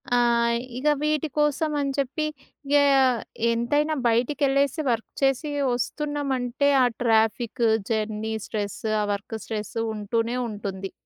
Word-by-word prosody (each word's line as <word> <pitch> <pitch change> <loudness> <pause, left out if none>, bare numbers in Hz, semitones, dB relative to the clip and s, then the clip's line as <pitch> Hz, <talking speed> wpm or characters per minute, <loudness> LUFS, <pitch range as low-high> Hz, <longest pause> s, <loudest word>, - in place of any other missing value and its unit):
ఆ! - - +4 0.6
ఇగ 280 +4 -2
వీటి 305 0 +1
కోసం 295 +1 +1
అని 280 -1 0
చెప్పి 280 +3 -1 0.4
ఇగ 285 - +2 0.8
ఎంతైనా 290 +7 +1
బయటికెళ్ళేసి 275 +4 +1
వర్క్ 230 -2 -1
చేసి 270 +2 +1 0.3
ఒస్తున్నామంటే 280 -1 -1
ఆ - - +5 0.2
ట్రాఫిక్, 225 +1 +1 0.3
జర్నీ, 220 0 -1
స్ట్రెస్సు 210 +1 -3
ఆ - - +1
వర్క్ 200 +3 -5
స్ట్రెస్సు 220 +1 -4
ఉంటూనే 230 +3 -1
ఉంటుంది. 195 -2 -5
245 Hz, 115 wpm, -25 LUFS, 220-285 Hz, 0.8 s, ఆ